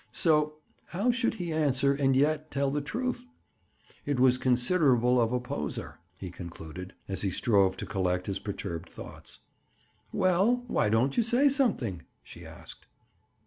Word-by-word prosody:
So, 150 Hz, -2 st, +2 dB, 0.3 s
how 205 Hz, +8 st, 0 dB
should 240 Hz, -2 st, 0 dB
he 175 Hz, -5 st, -4 dB
answer 140 Hz, -3 st, +2 dB
and 135 Hz, -1 st, +1 dB
yet 155 Hz, +3 st, +1 dB
tell 140 Hz, -1 st, -1 dB
the 145 Hz, +1 st, -1 dB
truth? 245 Hz, -, -4 dB, 0.8 s
It 145 Hz, -3 st, -1 dB
was 125 Hz, 0 st, +4 dB
considerable 125 Hz, -2 st, +3 dB
of 115 Hz, 0 st, +1 dB
a 125 Hz, -, 0 dB
"poser," 75 Hz, -, -5 dB, 0.2 s
he 95 Hz, -3 st, -7 dB
concluded, 85 Hz, +1 st, -9 dB
as 95 Hz, -1 st, -2 dB
he 100 Hz, -, +1 dB
strove 95 Hz, -2 st, +2 dB
to -, -, -5 dB
collect 90 Hz, -2 st, -1 dB
his 100 Hz, -1 st, -3 dB
perturbed 95 Hz, -5 st, -6 dB
thoughts. -, -, -9 dB, 0.7 s
"Well, 195 Hz, +7 st, +2 dB
why 170 Hz, -, +1 dB
don't 120 Hz, +6 st, +1 dB
you -, -, +5 dB
say 245 Hz, +5 st, +3 dB
something?" 200 Hz, -, 0 dB, 0.2 s
she -, -, -12 dB
asked. -, -, -12 dB
135 Hz, 150 wpm, -28 LUFS, -, 0.8 s, you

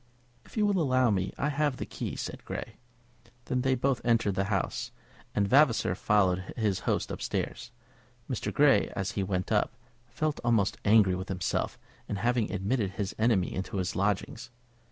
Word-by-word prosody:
"If -, -, -14 dB
you 210 Hz, -, +3 dB
will 200 Hz, -3 st, +2 dB
allow 130 Hz, -5 st, +3 dB
me, 95 Hz, -1 st, 0 dB
I 145 Hz, -, 0 dB
have 145 Hz, -2 st, 0 dB
the -, -, -4 dB
key," -, -, -5 dB
said -, -, -6 dB
Grey. -, -, -6 dB, 0.7 s
Then 125 Hz, -, 0 dB
they 130 Hz, 0 st, +2 dB
both 130 Hz, 0 st, 0 dB
entered 115 Hz, -4 st, +2 dB
the 95 Hz, +1 st, 0 dB
house, 100 Hz, -1 st, -1 dB, 0.5 s
and 100 Hz, -1 st, +2 dB
Vavasor 130 Hz, -7 st, +4 dB
followed 95 Hz, -1 st, +1 dB
his 105 Hz, -5 st, +1 dB
host -, -, 0 dB
up -, -, -5 dB
stairs. 120 Hz, -, -3 dB, 0.6 s
Mr. 125 Hz, -, -2 dB
Grey, 145 Hz, -2 st, +4 dB
as 95 Hz, 0 st, -2 dB
he 100 Hz, -, -2 dB
went 95 Hz, -1 st, -2 dB
up, -, -, +1 dB, 0.3 s
felt 150 Hz, +6 st, -2 dB
almost 115 Hz, -5 st, +2 dB
angry 105 Hz, -3 st, +5 dB
with 95 Hz, +1 st, -4 dB
himself 90 Hz, -2 st, -1 dB, 0.3 s
in -, -, -1 dB
having 120 Hz, +2 st, 0 dB
admitted 100 Hz, 0 st, -1 dB
his 100 Hz, 0 st, -3 dB
enemy 110 Hz, -5 st, +2 dB
into 95 Hz, +1 st, -4 dB
his 90 Hz, -2 st, -2 dB
lodgings. 105 Hz, +4 st, -1 dB
105 Hz, 175 wpm, -29 LUFS, 95-130 Hz, 0.7 s, angry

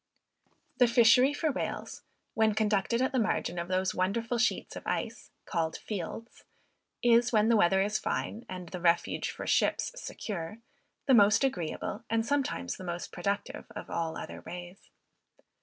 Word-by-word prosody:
The 245 Hz, -, +7 dB
fishery 235 Hz, +3 st, +6 dB
for 305 Hz, +1 st, 0 dB
whales, -, -, -4 dB, 0.3 s
when 220 Hz, -1 st, +2 dB
conducted 215 Hz, +3 st, +1 dB
at 260 Hz, -, +1 dB
the 260 Hz, -, +1 dB
margin 210 Hz, -5 st, 0 dB
of 170 Hz, -, -4 dB
those 185 Hz, +2 st, 0 dB
wonderful 225 Hz, +6 st, -1 dB
sheets 235 Hz, -, 0 dB
of -, -, -8 dB
ice, -, -, -3 dB, 0.2 s
called 160 Hz, -1 st, -1 dB
fields, 215 Hz, +3 st, -6 dB, 0.6 s
is, 240 Hz, 0 st, +5 dB
when 215 Hz, -1 st, +3 dB
the 230 Hz, -, +5 dB
weather 190 Hz, -1 st, +4 dB
is 210 Hz, +1 st, 0 dB
fine, 225 Hz, -, -3 dB
and 180 Hz, -2 st, -7 dB
the 180 Hz, -, -6 dB
refuge 170 Hz, 0 st, +1 dB
for -, -, -6 dB
ships -, -, +1 dB
secure, 205 Hz, -, -5 dB, 0.5 s
the 270 Hz, -, +4 dB
most 210 Hz, +1 st, +6 dB
agreeable, 205 Hz, -3 st, -2 dB
and 225 Hz, 0 st, +1 dB
sometimes 265 Hz, -, -1 dB
the -, -, -9 dB
most 175 Hz, -1 st, -5 dB
productive 200 Hz, +3 st, -3 dB
of -, -, -7 dB
all 165 Hz, -1 st, -2 dB
other -, -, -7 dB
ways. 175 Hz, +1 st, -9 dB
210 Hz, 155 wpm, -30 LUFS, 180-235 Hz, 0.6 s, The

